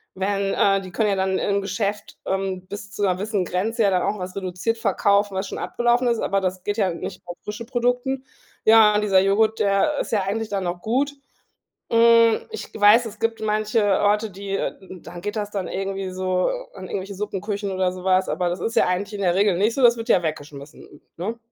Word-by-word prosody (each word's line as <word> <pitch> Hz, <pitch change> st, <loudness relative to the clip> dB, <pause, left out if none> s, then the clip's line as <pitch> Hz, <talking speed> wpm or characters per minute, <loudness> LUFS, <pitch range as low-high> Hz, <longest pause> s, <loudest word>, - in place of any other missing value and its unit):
werden 195 Hz, +1 st, -1 dB
äh, 195 Hz, -1 st, +3 dB
die 185 Hz, -1 st, -10 dB
können 215 Hz, +3 st, +1 dB
ja 200 Hz, -, +1 dB
dann 190 Hz, 0 st, 0 dB
im 200 Hz, 0 st, 0 dB
Geschäft, 200 Hz, +1 st, -3 dB
ähm, 190 Hz, -1 st, -2 dB
bis 205 Hz, +1 st, -8 dB
zu -, -, -7 dB
'ner 185 Hz, -2 st, +2 dB
gewissen 200 Hz, 0 st, -2 dB
Grenze 215 Hz, +7 st, -1 dB
ja 200 Hz, -, +4 dB
dann 180 Hz, -1 st, +2 dB
auch 205 Hz, +1 st, -1 dB
was 185 Hz, 0 st, -6 dB
reduziert 190 Hz, +4 st, -2 dB
verkaufen, 200 Hz, -2 st, +2 dB
was 190 Hz, +1 st, -2 dB
schon -, -, -6 dB
abgelaufen 240 Hz, +1 st, +1 dB
ist, 235 Hz, -1 st, +1 dB
aber 195 Hz, -, 0 dB
das 185 Hz, -1 st, -3 dB
geht 205 Hz, +2 st, -2 dB
ja 190 Hz, -5 st, +1 dB
nicht -, -, -7 dB
auf 175 Hz, 0 st, -8 dB
frische 210 Hz, +3 st, -6 dB
Produkten. 245 Hz, +2 st, -1 dB, 0.4 s
Ja, 220 Hz, -1 st, +7 dB
und 210 Hz, -, +2 dB
dieser 195 Hz, -3 st, +4 dB
Joghurt, 215 Hz, +3 st, +2 dB
der 200 Hz, +9 st, +2 dB
ist -, -, -3 dB
ja 215 Hz, -3 st, +2 dB
eigentlich 215 Hz, +3 st, -2 dB
dann 200 Hz, -2 st, -2 dB
noch 175 Hz, 0 st, -3 dB
gut. 270 Hz, +6 st, 0 dB, 0.8 s
Hm, 230 Hz, -1 st, +5 dB
ich 445 Hz, -, -7 dB
weiß, 210 Hz, +4 st, +6 dB
es 220 Hz, -1 st, -8 dB
gibt 225 Hz, 0 st, -1 dB
manche 215 Hz, +1 st, +1 dB, 0.2 s
Orte, 210 Hz, +1 st, +2 dB
die, 195 Hz, +1 st, -7 dB
äh -, -, -2 dB, 0.3 s
dann 175 Hz, +1 st, -10 dB
geht 205 Hz, +4 st, -4 dB
das 205 Hz, -1 st, -2 dB
dann 195 Hz, -3 st, -3 dB
irgendwie 195 Hz, 0 st, -3 dB
so 185 Hz, 0 st, 0 dB, 0.2 s
an -, -, -9 dB
irgendwelche 195 Hz, +1 st, -5 dB
Suppenküchen 200 Hz, 0 st, -3 dB
oder 185 Hz, -1 st, 0 dB
so 185 Hz, -1 st, -9 dB
was, 185 Hz, 0 st, +2 dB
aber 180 Hz, -1 st, 0 dB
das 175 Hz, +1 st, -3 dB
ist 225 Hz, +6 st, -3 dB
ja -, -, +4 dB
eigentlich 195 Hz, +3 st, -2 dB
in 200 Hz, -, -5 dB
der 180 Hz, -2 st, +2 dB
Regel 200 Hz, -2 st, +3 dB
nicht 210 Hz, +5 st, +2 dB
so. 275 Hz, -, -1 dB
Das 240 Hz, -1 st, +6 dB
wird 230 Hz, +1 st, -6 dB
ja 185 Hz, -, +5 dB
weggeschmissen, 145 Hz, -2 st, -7 dB, 0.2 s
ne? 215 Hz, +7 st, -4 dB
200 Hz, 220 wpm, -23 LUFS, 185-220 Hz, 0.8 s, Ja